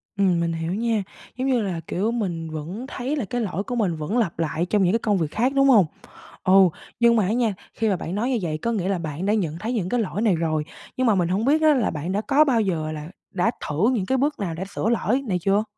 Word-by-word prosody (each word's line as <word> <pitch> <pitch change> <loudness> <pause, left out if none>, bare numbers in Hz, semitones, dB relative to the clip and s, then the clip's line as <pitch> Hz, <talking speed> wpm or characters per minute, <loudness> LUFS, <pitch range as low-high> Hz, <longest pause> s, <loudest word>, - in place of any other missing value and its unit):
Ừm, 190 -4 +2
mình 170 0 0
hiểu 165 +1 -3
nha. 225 0 0 0.3
Giống 260 - -1
như 255 -3 +2
là, 185 -5 -2
kiểu, 210 +5 0
mình 175 -9 -3
vẫn 160 - -6
thấy 265 +3 -3
là 275 -7 -2
cái 245 +5 -2
lỗi 195 -3 -2
của 245 - -4
mình 200 -8 +1
vẫn 155 +9 -2
lặp 195 -9 0
lại 165 +1 0
trong 200 +2 +2
những 180 +2 +3
cái 230 - +2
công 210 -3 +1
việc 160 -4 -1
khác, 250 +5 +1
đúng 275 0 +5
hông? 215 -8 +7 0.6
Ừ. 185 - +3 0.5
Nhưng 235 0 +5
mà 210 -4 +3
á 200 - 0
nha, 230 -3 +1 0.2
khi 225 - 0
mà 195 - +2
bạn 170 +1 -5
nói 230 +6 0
như 250 - +1
vậy 155 -3 -2
có 235 +9 -1
nghĩa 190 -5 -1
là 195 -2 0
bạn 160 +2 -4
đã 210 - +3
nhận 165 -7 -1
thấy 220 +6 -3
những 205 -7 -1
cái 245 +4 +1
lỗi 210 0 -2
này 215 -5 +3
rồi, 155 -2 -1 0.3
nhưng 255 -1 +1
mà 220 - +4
mình 175 -3 +1
hổng 195 +5 0
biết 305 +4 +3
á, 310 -1 +6
là 250 -6 +1
bạn 160 +4 -4
đã 205 - 0
có 285 +6 +4
bao 255 -6 +2
giờ 165 -7 -1
là 155 0 -6 0.3
đã 190 +4 +2 0.2
thử 165 +11 +2
những 200 -7 -1
cái 265 0 +1
bước 290 +3 0
nào 180 -5 -3
đã 175 +4 -4
sửa 205 - -2
lỗi 235 +2 +1
này 185 -3 +1
chưa? 200 +4 +2
200 Hz, 280 wpm, -23 LUFS, 170-235 Hz, 0.6 s, hông